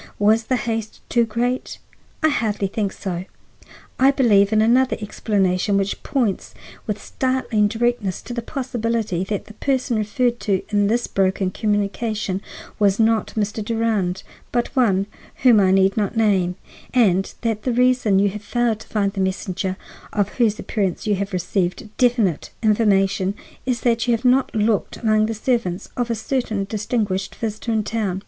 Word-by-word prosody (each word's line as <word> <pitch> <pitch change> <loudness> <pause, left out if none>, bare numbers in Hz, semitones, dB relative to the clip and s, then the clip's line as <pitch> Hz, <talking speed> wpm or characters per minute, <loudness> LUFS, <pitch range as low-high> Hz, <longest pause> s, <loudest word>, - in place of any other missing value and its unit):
Was 220 +2 +3
the 255 - +1
haste 225 -3 -3
too 235 -1 +3
great? 240 +3 -2 0.5
I 315 - +5
hardly 215 -7 0
think 200 0 -2
so. 180 -2 -5 0.7
I 265 +1 +6
believe 215 -7 +4
in 215 - +3
another 250 +4 +3
explanation, 200 -2 0
which 195 0 -1
points 235 -9 -1 0.3
with 210 -1 -2
startling 255 -5 0
directness 225 -3 -1
to 240 - -7
the 235 - -2
possibility 230 - -2
that 205 0 -3
the 215 - -12
person 255 0 0
referred 240 +3 0
to 195 -3 0
in 205 -1 +2
this 235 +3 +1
broken 190 -1 0
communication 205 -1 -1 0.4
was 200 -1 +3
not 225 -1 +2
Mr. 210 +1 -1
Durand, 215 -5 -1 0.3
but 240 +3 -1
one 200 -7 +3 0.4
whom 240 -5 +7
I 190 -2 +4
need 190 0 +4
not 215 +1 -1
name; 190 -5 +2 0.4
and 195 -6 +3
that 225 -2 -1
the 255 - -1
reason 250 -4 +3
you 200 +1 +3
have 210 +1 -7
failed 235 0 0
to - - -13
find 200 -2 0
the 195 - -2
messenger, 190 0 -2 0.3
of 205 -2 0
whose 220 -3 +3
appearance 195 -5 -2
you 210 - +2
have 200 +1 -3
received 185 +1 -1
definite 235 - +2
information, 200 -3 +2 0.3
is 250 -2 0
that 235 -1 +1
you 240 - +4
have 230 +3 -7
not 255 0 +3
looked 215 -1 +1
among 215 -1 +2
the 225 - -3
servants 215 -5 -1
of 245 -1 -1
a 230 - 0
certain 220 -3 -1
distinguished 200 -2 -2
visitor 225 +1 -3
in 220 -1 +1
town. 205 -3 -2
215 Hz, 165 wpm, -21 LUFS, 195-235 Hz, 0.7 s, whom